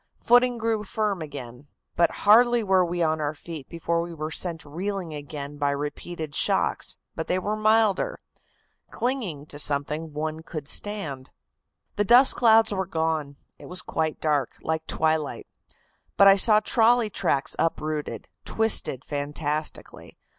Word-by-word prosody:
Footing 245 0 +3
grew 225 -2 -1
firm 210 -3 -2
again, 140 -3 -9 0.3
but 170 - +3 0.2
hardly 240 +2 +5
were 190 -2 +3
we 175 0 -1
on 155 -1 0
our 150 +1 -2
feet 155 -2 -9
before 170 0 -2
we 170 0 -7
were 155 0 -5
sent 165 -1 -1
reeling 180 +2 -4
again 145 0 -7
by 145 -1 +1
repeated 150 +2 -5
shocks, - - +1 0.2
but 160 - -5
they 180 - 0
were 205 +3 -2
milder. 215 -2 +2 0.7
Clinging 225 - -3
to 145 -1 -9
something, 150 +2 0
one 155 +1 -4
could 155 -3 -7
stand. 160 -13 -2 0.7
"The 205 - +2
dust 245 +6 +6
clouds 225 -2 +4
were 190 -2 -2
gone. 160 -4 -2 0.2
It - - -12
was 180 0 -5
quite 160 -1 -2
dark, 145 -5 -1
like 160 0 -3
twilight. 155 -2 -1 0.7
But 200 - +7
I 195 - +8
saw 210 +2 +5
trolley 230 0 +3
tracks 140 -7 0
uprooted, 155 -2 -2 0.2
twisted 220 - +1
fantastically. 150 +1 -4
165 Hz, 145 wpm, -25 LUFS, 150-210 Hz, 0.7 s, I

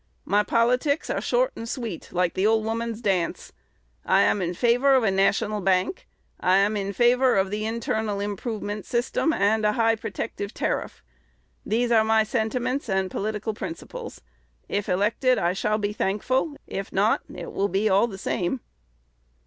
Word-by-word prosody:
My 205 +2 +3
politics 250 +7 +1
are - - -1
short - - +1
and 230 - -6
sweet, 230 - -5
like 180 -1 +1
the 195 +3 +1
old 220 0 +2
woman's 230 0 -3
dance. 190 -6 -1 0.5
I - - +4
am 205 - +2
in 175 0 -2
favor 245 +6 +4
of 260 - +3
a 205 - +2
national 205 +2 +1
bank. 190 - 0 0.3
I 185 +1 +3
am 200 +2 +2
in 200 -1 -2
favor 245 +4 +3
of 190 0 +1
the 215 +1 -2
internal 220 -2 -2
improvement 205 0 -4
system 245 +6 0
and 220 -5 +2
a 210 0 +3
high 225 0 +3
protective 215 -1 -5
tariff. - - -3 0.6
These 240 +2 0
are 220 -2 +5
my 220 0 +3
sentiments 250 +3 -2
and 190 -1 0
political 215 +1 -3
principles. 180 -5 -7 0.5
If 205 0 -2
elected, 215 +7 +2
I 175 +1 +1
shall 210 +2 0
be 205 -1 -2
thankful; 255 +9 0
if 195 0 -5
not, 205 +3 +2
it - - -7
will 200 - 0
be 195 +4 +1
all 200 +3 +4
the 195 -4 -8
same." 190 +5 -2
215 Hz, 165 wpm, -25 LUFS, 195-235 Hz, 0.6 s, are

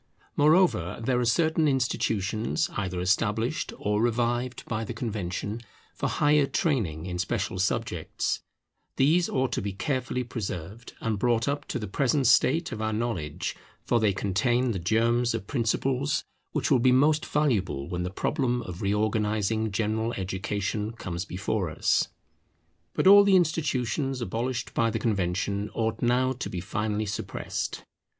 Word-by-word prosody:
Moreover, 150 - +3
there 125 +2 +1
are 125 - +1
certain 160 +5 +2
institutions 110 - 0
either 95 -3 -2
established 105 - 0
or 105 +1 0
revived 120 +1 0
by 110 0 -2
the - - -6
Convention 105 0 -3 0.3
for - - -2
higher 145 -1 +3
training 100 - 0
in 90 -1 -4
special 95 -1 -2
subjects; 95 - -1 0.6
these 165 +6 +3
ought 130 -1 0
to - - -1
be 100 -1 -3
carefully 125 +2 -2
preserved, 105 -2 -6
and 110 -3 -1
brought 115 0 +2
up 145 +1 -2
to - - -2
the 110 - -4
present 135 +6 +1
state 160 +7 +4
of 110 - -5
our 110 0 0
knowledge, 105 -10 -2 0.3
for 120 - +2
they 110 -2 +3
contain 115 +6 +1
the 95 - -2
germs 115 +6 +2
of - - -4
principles 135 +4 0 0.3
which - - -1
will 130 - +5
be 130 +2 +4
most 150 +4 +4
valuable 105 - 0
when 90 0 -3
the 90 - -2
problem 125 +4 -1
of 90 -4 -7
reorganizing 105 +1 0
general 110 +2 -1
education 100 +3 -2
comes 90 -5 -5
before 95 -1 -2
us. 80 - +1 0.9
But - - +1
all 200 +1 +9
the 200 -1 +5
institutions 140 -6 +1
abolished 120 +2 -3
by 115 0 +2
the - - -1
Convention 100 0 -1
ought 110 -1 -1
now 125 +2 +2
to 120 - -5
be 90 - -4
finally 105 +4 -2
suppressed. 105 - -4
115 Hz, 150 wpm, -27 LUFS, 100-130 Hz, 0.9 s, all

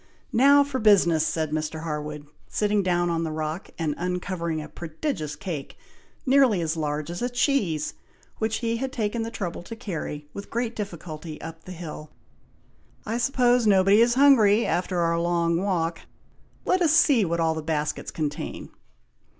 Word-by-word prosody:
"Now, 280 +4 +6
for 280 -2 -3
business!" 175 -7 +4
said 155 -2 -1
Mr. 155 +1 -3
Harwood, 150 -2 -5 0.2
sitting 210 -1 +1
down 175 -2 +1
on 165 0 0
the 160 - -2
rock, 155 +3 -4
and 160 -3 -1
uncovering 180 -2 -2
a 150 - -6
prodigious 155 - -4
cake, 175 -8 -6 0.5
nearly 260 -7 +4
as 165 -1 -1
large 150 0 -2
as 175 - -5
a 245 - 0
cheese, 245 - 0 0.5
which 220 0 0
he 230 0 0
had 265 +2 -3
taken 225 -2 -2
the 225 - -3
trouble 185 -8 -5
to 200 +6 -8
carry, 160 -9 -5
with 200 - -8
great 235 0 -2
difficulty, 165 -6 -6
up 165 0 -9
the 185 - -8
hill. 160 -3 -8 1.0
"I 225 +2 -2
suppose 245 -2 +3
nobody 195 +1 +5
is 235 +1 +4
hungry 235 -6 +5
after 180 +1 0
our 170 0 +1
long 170 -1 +1
walk! 170 -4 -1 0.7
Let 370 0 +2
us 320 -3 +4
see 290 -8 +5
what 170 -2 -1
all 165 -1 +2
the 160 - -4
baskets 155 -1 -2
contain!" 150 -2 -4
175 Hz, 165 wpm, -25 LUFS, 160-230 Hz, 1.0 s, Now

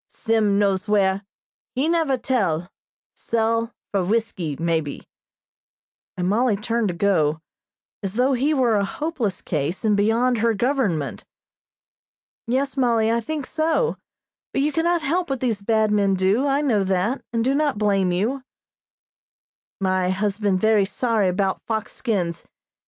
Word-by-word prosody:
Sim 220 -3 +1
knows 200 0 +1
where 195 -2 +2 0.5
he 270 +4 +1
never 325 -5 +1
tell 195 -9 -1 0.4
sell 230 0 -1 0.2
for 195 -2 +1
whiskey, 190 -6 -1
maybe," 165 -3 -2 1.1
and 180 0 -1
Mollie 225 +3 +2
turned 225 +2 -1
to 180 - -3
go, 160 -6 +2 0.6
as 195 0 -4
though 255 +3 +3
he 265 +4 +1
were 250 -7 +3
a 200 - +1
hopeless 245 - -3
case, 155 +6 -2
and 210 -1 +3
beyond 225 +4 +2
her 230 0 +2
government. 195 - -1 1.2
"Yes, 270 +3 0
Mollie, 230 -4 +2
I 230 - +2
think 295 +3 -4
so; 325 - 0 0.6
but 275 - +1
you 300 - +1
can 325 +3 0
not 345 -2 +1
help 345 +4 0
what 270 -2 -1
these 230 -5 -1
bad 220 0 +2
men 200 -2 +2
do. 195 +9 +2
I 280 +1 +2
know 230 -9 +2
that, 190 +7 0
and 230 0 0
do 265 - +2
not 290 -4 +1
blame 200 -3 +2
you." 220 +10 -1 1.4
"My 185 -1 +1
husband 200 0 0
very 220 0 +4
sorry 210 -1 0
'bout 190 +1 -1
fox 220 -2 -2
skins. 185 -9 -2
220 Hz, 145 wpm, -23 LUFS, 190-255 Hz, 1.4 s, very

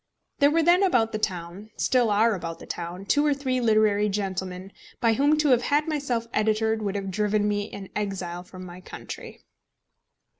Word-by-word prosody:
There 285 -1 +6
were 325 +2 +2
then 350 +3 +5
about 245 - +2
the 215 - -3
town 185 +1 -4
still 245 -3 +2
are 220 +2 +3
about 165 -3 -5
the - - -12
town 175 +3 -6
two 290 +8 +2
or 295 -1 +2
three 260 -2 -1
literary 215 -2 +3
gentlemen, 190 -1 -4 0.3
by 230 -1 +3
whom 285 +6 +3
to 300 -1 +2
have 250 -2 +4
had 295 +4 +1
myself 275 -7 -1
editored 220 +1 +1
would 205 -1 -2
have 195 -1 -3
driven 210 +1 +1
me 205 0 -2
an 195 -1 -8
exile 190 -4 -3
from 185 0 -11
my 180 0 -10
country. - - -9
215 Hz, 185 wpm, -25 LUFS, 190-255 Hz, 0.3 s, There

